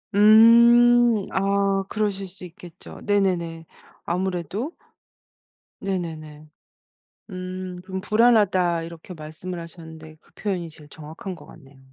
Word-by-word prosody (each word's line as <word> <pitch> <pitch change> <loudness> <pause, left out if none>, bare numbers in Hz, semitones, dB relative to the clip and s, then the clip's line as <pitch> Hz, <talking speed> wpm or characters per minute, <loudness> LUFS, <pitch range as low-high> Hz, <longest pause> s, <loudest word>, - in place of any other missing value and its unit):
음 235 +3 +7 0.2
아 195 0 +1
그러실 200 -2 -2
수 185 0 -8
있겠죠. 175 -1 -13
네네네. 175 -5 -1 0.4
아무래도? 185 - -3 1.1
네네네. 155 -5 -5 0.8
음 185 0 -6
그럼 190 0 -5
"불안하다." 200 -7 +2
이렇게 170 +2 -10
말씀을 160 +3 -8
하셨는데 160 -2 -12
그 - - -28
표현이 185 -5 -3
제일 155 -2 -14
정확한 160 +5 -9
것 145 -3 -15
같네요. 135 -3 -17
185 Hz, 245 characters per minute, -23 LUFS, 165-200 Hz, 1.1 s, 음